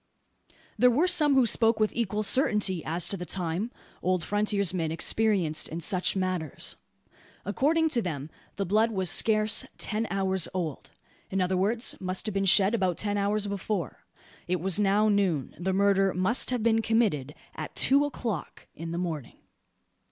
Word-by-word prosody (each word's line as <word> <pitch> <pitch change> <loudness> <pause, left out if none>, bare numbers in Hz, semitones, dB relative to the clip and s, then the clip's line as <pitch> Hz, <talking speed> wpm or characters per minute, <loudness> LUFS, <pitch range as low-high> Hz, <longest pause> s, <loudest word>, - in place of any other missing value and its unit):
There 250 - +6
were 275 +9 +2
some 300 -6 +3
who 260 -2 +5
spoke 225 -1 +2
with 215 -1 +1
equal 215 -2 -1
certainty 210 - +2
as 165 +2 -2
to 200 - +2
the 180 - -6
time 180 +4 -2 0.3
old 185 -2 0
frontiersmen 200 -5 0
experienced 180 -2 +1
in 165 - -5
such 180 +4 0
matters. 185 -6 -2 0.7
According 315 - +1
to 245 -6 +1
them 155 -5 -5 0.2
the 200 - -2
blood 215 +5 +2
was 190 -5 0
scarce 215 -1 +3
"ten 220 +1 -2
hours 190 -3 0
old:" 165 -6 -4 0.4
in 195 - -2
other 185 0 +1
words, 220 +6 0
must 185 +1 -3
have 215 - -3
been 195 0 0
shed 195 +2 +5
about 185 -6 0
ten 205 -1 -1
hours 205 +1 0
before. 200 - -4 0.5
It 180 0 0
was 190 +3 +1
now 205 +1 +3
noon. 190 - 0
The 190 +2 -1
murder 195 -1 +2
must 185 +7 +1
have 250 -3 -2
been 225 -1 +3
committed 205 - 0 0.2
at - - -7
two 280 +2 +4
o'clock 235 - -5
in 165 +1 -7
the 170 - -4
morning. 160 -8 -5
195 Hz, 165 wpm, -27 LUFS, 180-220 Hz, 0.7 s, There